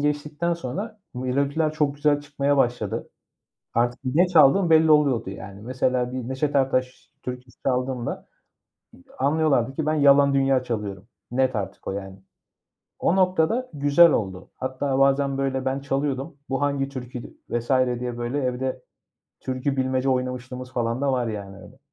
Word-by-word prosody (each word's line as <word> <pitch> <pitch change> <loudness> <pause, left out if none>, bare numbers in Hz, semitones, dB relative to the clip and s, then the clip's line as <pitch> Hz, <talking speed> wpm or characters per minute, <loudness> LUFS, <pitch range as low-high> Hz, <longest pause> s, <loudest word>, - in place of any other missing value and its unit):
geçtikten 150 +3 -1
sonra 195 - -6
melodiler 140 +5 0
çok 150 -2 0
güzel 145 0 +2
çıkmaya 145 -1 0
başladı. 120 -6 0 0.7
Artık 120 +1 +1
ne 150 +8 +3
çaldığım 170 +2 +5
belli 160 0 +6
oluyordu 140 -9 +3
yani. 95 +1 -9
Mesela, 125 +1 0
bir 125 -2 -4
Neşet 140 +3 -1
Ertaş 130 -1 0
türküsü 125 -1 -8
çaldığımda, 125 -2 -1 0.9
anlıyorlardı 140 -3 +2
ki 155 +1 -2
ben 155 - +2
Yalan 140 -1 +5
Dünya 135 -1 +3
çalıyorum. 105 -5 -4 0.3
Net 130 -1 +1
artık 95 -1 -5
o - - -1
yani. 95 -1 -7 0.8
O 180 - +2
noktada 185 +7 +2
güzel 145 +4 +6
oldu. 95 -3 -2
Hatta, 130 +1 -2
bazen 135 0 +3
böyle, 135 -1 -1
ben 135 +1 0
çalıyordum 140 +1 -2
"Bu 135 0 -1
hangi 140 -1 0
türkü 125 -2 -8
vs." 120 0 -3 0.3
diye 125 -1 -4
böyle 120 +4 -2
evde 130 0 -2 0.6
türkü 130 +2 -2
bilmece 130 0 0
oynamışlığımız 125 0 -3
falan 120 0 -1
da 140 -1 +1
var 125 -2 0
yani 100 -3 -6
öyle. - - -14
130 Hz, 145 wpm, -24 LUFS, 125-145 Hz, 0.9 s, belli